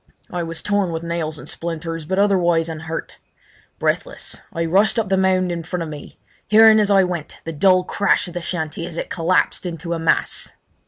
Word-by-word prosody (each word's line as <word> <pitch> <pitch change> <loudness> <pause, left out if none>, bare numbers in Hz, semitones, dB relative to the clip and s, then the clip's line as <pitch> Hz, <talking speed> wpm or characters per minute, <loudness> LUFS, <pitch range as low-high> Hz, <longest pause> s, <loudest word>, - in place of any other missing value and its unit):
I 180 - -2
was 165 -1 -5
torn 205 -3 +1
with 165 0 -4
nails 170 -2 -3
and - - -11
splinters, 165 -1 -4
but 190 +4 -2
otherwise 175 -5 +3
unhurt. 160 0 -6 0.6
Breathless - - -2 0.2
I 165 0 -2
rushed 195 +8 +3
up 220 -4 0
the 195 - +3
mound 185 -1 +2
in 170 -1 -3
front 175 +1 -4
of 160 - -6
me, 150 -1 -10 0.3
hearing 220 0 +7
as 210 -1 +2
I 195 -1 +5
went 175 -4 -4
the 165 - -5
dull 185 +3 +4
crash 200 0 +1
of 175 - -8
the 175 - -4
shanty 165 -1 -4
as 170 - -8
it - - -4
collapsed 175 +2 +1
into 170 -1 -4
a 165 - -2
mass. 165 - 0
170 Hz, 200 wpm, -21 LUFS, 165-190 Hz, 0.6 s, hearing